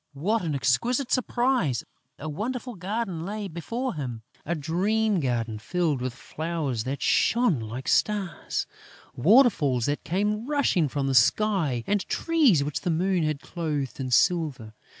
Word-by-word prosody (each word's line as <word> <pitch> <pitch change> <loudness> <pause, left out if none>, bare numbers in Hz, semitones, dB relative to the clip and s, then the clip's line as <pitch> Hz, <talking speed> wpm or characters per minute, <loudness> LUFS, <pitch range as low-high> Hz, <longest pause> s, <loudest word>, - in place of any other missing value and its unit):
What 205 +11 0
an 160 -5 -2
exquisite 235 - +1
surprise! 245 - +1 0.3
A 155 - -7
wonderful 240 - -4
garden 190 -2 -3
lay 205 +2 -4
before 230 +10 -4
him, 125 -7 -5 0.2
a 170 - 0
dream 195 +7 +1
garden 115 -6 -1
filled 155 +1 -1
with 125 -1 -3
flowers 145 -3 -3
that 135 +2 -3
shone 230 - +3
like 115 +4 -6
stars, 205 -5 0 0.5
waterfalls 160 - +4
that 145 +1 -2
came 210 +6 -1
rushing 275 - +2
from 140 +1 -2
the 135 - 0
sky 160 - +2
and 205 -1 +1
trees 290 - +3
which 145 0 -3
the - - -2
moon 180 +2 +1
had 155 -2 -1
clothed 150 -7 -4
in 130 -1 -3
silver. 135 -6 +1
170 Hz, 145 wpm, -26 LUFS, 135-210 Hz, 0.5 s, waterfalls